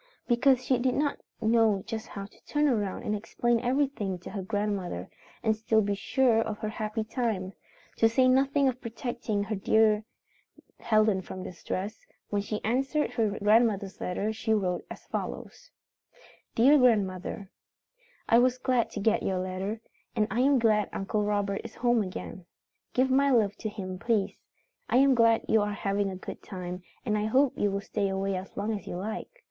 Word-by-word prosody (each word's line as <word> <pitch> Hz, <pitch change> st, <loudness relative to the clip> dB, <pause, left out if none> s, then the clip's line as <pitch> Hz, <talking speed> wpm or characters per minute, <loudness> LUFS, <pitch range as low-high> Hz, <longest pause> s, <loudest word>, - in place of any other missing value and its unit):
Because 255 Hz, +1 st, +3 dB
she 255 Hz, -1 st, +2 dB
did 255 Hz, 0 st, +1 dB
not 290 Hz, 0 st, 0 dB, 0.2 s
know 220 Hz, -3 st, +3 dB
just 225 Hz, -1 st, -5 dB
how 200 Hz, -1 st, -7 dB
to 200 Hz, -, -19 dB
turn 295 Hz, 0 st, +2 dB
around 210 Hz, -8 st, -1 dB
and 210 Hz, -, -1 dB
explain 235 Hz, +3 st, 0 dB
everything 250 Hz, -6 st, 0 dB
to 175 Hz, -, -10 dB
her 200 Hz, -, -4 dB
grandmother 195 Hz, -, -2 dB, 0.4 s
and 220 Hz, -1 st, +2 dB
still 220 Hz, 0 st, +2 dB
be 200 Hz, 0 st, 0 dB
sure 235 Hz, +3 st, +2 dB
of 215 Hz, -2 st, -3 dB
her 215 Hz, -, -3 dB
happy 215 Hz, 0 st, -3 dB
time, 215 Hz, -5 st, -2 dB, 0.4 s
to 225 Hz, -, +5 dB
say 255 Hz, +3 st, +3 dB
nothing 275 Hz, +2 st, +3 dB
of 255 Hz, -1 st, -1 dB
protecting 230 Hz, -3 st, -3 dB
her 215 Hz, +2 st, -3 dB
dear 215 Hz, +1 st, +3 dB, 0.8 s
Helen 215 Hz, -3 st, +2 dB
from 185 Hz, 0 st, -8 dB
distress, 185 Hz, -, -5 dB, 0.3 s
when 205 Hz, -1 st, +1 dB
she 210 Hz, +1 st, -4 dB
answered 270 Hz, +6 st, 0 dB
her 215 Hz, -3 st, 0 dB
grandmother's 210 Hz, -2 st, +2 dB
letter 200 Hz, +4 st, -1 dB
she 220 Hz, 0 st, 0 dB
wrote 185 Hz, -4 st, -1 dB
as -, -, -10 dB
follows: -, -, -6 dB, 0.9 s
Dear 275 Hz, +6 st, +6 dB
Grandmother: 195 Hz, -5 st, +1 dB, 0.8 s
"I 230 Hz, -, +6 dB
was 250 Hz, +1 st, +3 dB
glad 255 Hz, -2 st, +1 dB
to -, -, -4 dB
get 215 Hz, +2 st, +2 dB
your 190 Hz, -, -1 dB
letter, 185 Hz, +4 st, -3 dB, 0.3 s
and 215 Hz, -2 st, +3 dB
I 225 Hz, -, 0 dB
am 275 Hz, +2 st, +4 dB
glad 215 Hz, -3 st, +2 dB
Uncle 210 Hz, +2 st, -1 dB
Robert 205 Hz, -1 st, 0 dB
is -, -, -9 dB
home 240 Hz, -1 st, +2 dB
again. 185 Hz, -2 st, -6 dB, 0.5 s
Give 260 Hz, +1 st, +3 dB
my 280 Hz, +2 st, +4 dB
love 215 Hz, -6 st, +3 dB
to 220 Hz, -, -4 dB
him, 185 Hz, -3 st, -6 dB
please. 220 Hz, -4 st, 0 dB, 0.5 s
I -, -, +3 dB
am 275 Hz, +1 st, +6 dB
glad 230 Hz, -2 st, +4 dB
you 220 Hz, -, +4 dB
are 205 Hz, 0 st, -1 dB
having 200 Hz, 0 st, -1 dB
a 190 Hz, -, -5 dB
good 185 Hz, -, -8 dB
time, 180 Hz, -1 st, -6 dB, 0.2 s
and 215 Hz, -3 st, +1 dB
I 210 Hz, -, -1 dB
hope 260 Hz, +4 st, +3 dB
you 205 Hz, -, +1 dB
will 200 Hz, 0 st, -2 dB
stay 200 Hz, 0 st, -1 dB
away 195 Hz, 0 st, -1 dB
as 185 Hz, +1 st, -7 dB
long 210 Hz, +2 st, -1 dB
as 205 Hz, -, -6 dB
you -, -, -4 dB
like. 210 Hz, +4 st, -4 dB
215 Hz, 180 wpm, -28 LUFS, 200-240 Hz, 0.9 s, Dear